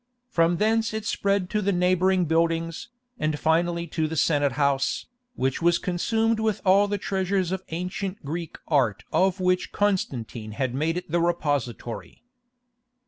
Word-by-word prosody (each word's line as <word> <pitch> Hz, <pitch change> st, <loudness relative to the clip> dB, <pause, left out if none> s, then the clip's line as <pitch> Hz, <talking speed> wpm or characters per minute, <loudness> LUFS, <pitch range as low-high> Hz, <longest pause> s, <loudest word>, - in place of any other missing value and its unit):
From 165 Hz, +1 st, +3 dB
thence 220 Hz, +2 st, +1 dB
it 220 Hz, -1 st, -4 dB
spread 200 Hz, -3 st, 0 dB
to 210 Hz, -, +1 dB
the 200 Hz, 0 st, +1 dB
neighbouring 185 Hz, 0 st, +2 dB
buildings, 165 Hz, +3 st, 0 dB, 0.3 s
and 155 Hz, -1 st, 0 dB
finally 170 Hz, +2 st, +1 dB
to 160 Hz, 0 st, -1 dB
the 160 Hz, -, -4 dB
Senate 145 Hz, -3 st, +2 dB
house, 140 Hz, -1 st, +1 dB, 0.3 s
which 130 Hz, +3 st, -1 dB
was 170 Hz, 0 st, +4 dB
consumed 225 Hz, +5 st, 0 dB
with 220 Hz, -2 st, 0 dB
all 195 Hz, +2 st, +5 dB
the 205 Hz, 0 st, -1 dB
treasures 190 Hz, -2 st, -1 dB
of 190 Hz, -1 st, -2 dB
ancient 185 Hz, +2 st, -4 dB
Greek 165 Hz, +2 st, -5 dB
art 115 Hz, -, +1 dB
of 190 Hz, 0 st, +2 dB
which 185 Hz, 0 st, +1 dB
Constantine 120 Hz, -, -1 dB
had 130 Hz, +2 st, -2 dB
made 160 Hz, +5 st, 0 dB
it 180 Hz, -3 st, -6 dB
the 170 Hz, 0 st, +2 dB
repository. 145 Hz, -, -2 dB
175 Hz, 150 wpm, -25 LUFS, 155-190 Hz, 0.3 s, all